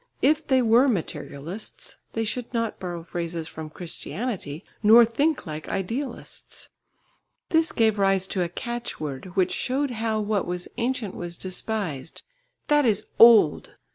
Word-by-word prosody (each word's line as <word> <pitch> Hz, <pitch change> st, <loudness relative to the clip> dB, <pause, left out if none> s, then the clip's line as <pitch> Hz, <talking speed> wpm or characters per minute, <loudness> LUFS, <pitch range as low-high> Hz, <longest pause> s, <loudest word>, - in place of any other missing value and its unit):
If 305 Hz, +2 st, +3 dB
they 260 Hz, -3 st, +4 dB
were 235 Hz, +4 st, +5 dB
materialists, 175 Hz, -, -4 dB, 0.2 s
they 225 Hz, -, -1 dB
should 235 Hz, +2 st, -3 dB
not 230 Hz, -2 st, -1 dB
borrow 175 Hz, -2 st, -5 dB
phrases 170 Hz, -1 st, -4 dB
from 160 Hz, -1 st, -7 dB
Christianity, 175 Hz, -, -5 dB, 0.2 s
nor 225 Hz, +2 st, +8 dB
think 280 Hz, +7 st, 0 dB
like 155 Hz, 0 st, -6 dB
idealists. 235 Hz, +7 st, -5 dB, 0.8 s
This 325 Hz, 0 st, +3 dB
gave 220 Hz, -2 st, +2 dB
rise 195 Hz, -1 st, +3 dB
to 185 Hz, -, 0 dB
a 175 Hz, -, 0 dB
catchword, 180 Hz, -, -5 dB
which 185 Hz, -2 st, +2 dB
showed 270 Hz, +1 st, 0 dB
how 220 Hz, -1 st, -1 dB
what 210 Hz, -2 st, 0 dB
was 180 Hz, 0 st, -2 dB
ancient 240 Hz, -4 st, -1 dB
was 175 Hz, 0 st, -6 dB
despised 185 Hz, -6 st, -4 dB, 0.4 s
"That 295 Hz, 0 st, +4 dB
is 215 Hz, -3 st, +1 dB
old!" 225 Hz, -10 st, +6 dB
210 Hz, 140 wpm, -25 LUFS, 175-240 Hz, 0.8 s, nor